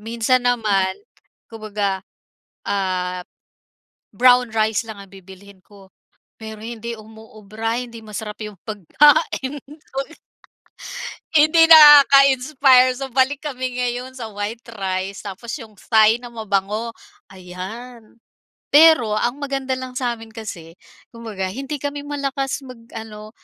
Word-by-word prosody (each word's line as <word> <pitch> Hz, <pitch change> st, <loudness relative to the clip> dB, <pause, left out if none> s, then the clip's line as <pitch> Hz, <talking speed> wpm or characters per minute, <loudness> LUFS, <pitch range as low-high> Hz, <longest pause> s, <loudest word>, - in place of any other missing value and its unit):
Minsan 235 Hz, +3 st, 0 dB
naman 205 Hz, -6 st, +1 dB, 0.5 s
kumbaga, 205 Hz, -3 st, -3 dB, 0.7 s
ah, 185 Hz, -2 st, -2 dB, 0.9 s
brown 250 Hz, 0 st, +4 dB
rice 220 Hz, 0 st, 0 dB
lang 215 Hz, -2 st, -8 dB
ang 195 Hz, -, -13 dB
bibilhin 190 Hz, +1 st, -15 dB
ko 200 Hz, -2 st, -18 dB, 0.5 s
pero 220 Hz, -1 st, -8 dB
hindi 235 Hz, +1 st, -6 dB
umuubra 220 Hz, +1 st, -6 dB
hindi 235 Hz, -2 st, -9 dB
masarap 210 Hz, 0 st, -7 dB
yung 210 Hz, -4 st, -10 dB
pagkain 285 Hz, -, +2 dB
ko 295 Hz, -2 st, -12 dB, 1.4 s
hindi 310 Hz, +2 st, +6 dB
nakaka-inspire. 275 Hz, -3 st, +7 dB
So, 270 Hz, -1 st, -6 dB
balik 265 Hz, +2 st, +1 dB
kami 255 Hz, -2 st, -3 dB
ngayon 250 Hz, +1 st, -3 dB
sa 225 Hz, -, -6 dB
white 205 Hz, +3 st, -5 dB
rice 190 Hz, 0 st, -4 dB
tapos 225 Hz, +5 st, -8 dB
yung 220 Hz, -2 st, -12 dB
Thai 220 Hz, +2 st, +3 dB
na 240 Hz, -, -9 dB
mabango, 215 Hz, +1 st, -2 dB, 0.4 s
ayan. 215 Hz, +7 st, -10 dB, 0.6 s
Pero 295 Hz, -8 st, +6 dB
ang 240 Hz, +5 st, -1 dB
maganda 270 Hz, -2 st, -3 dB
lang 255 Hz, -1 st, -7 dB
sa'min 235 Hz, -3 st, -4 dB
kasi 170 Hz, -8 st, -9 dB, 0.4 s
kumbaga 220 Hz, -5 st, -6 dB
hindi 275 Hz, +8 st, -5 dB
kami 285 Hz, 0 st, -4 dB
malakas 275 Hz, -1 st, -3 dB
mag 255 Hz, -2 st, -11 dB, 0.2 s
ano 215 Hz, -1 st, -9 dB
230 Hz, 115 wpm, -20 LUFS, 205-260 Hz, 1.4 s, nakaka-inspire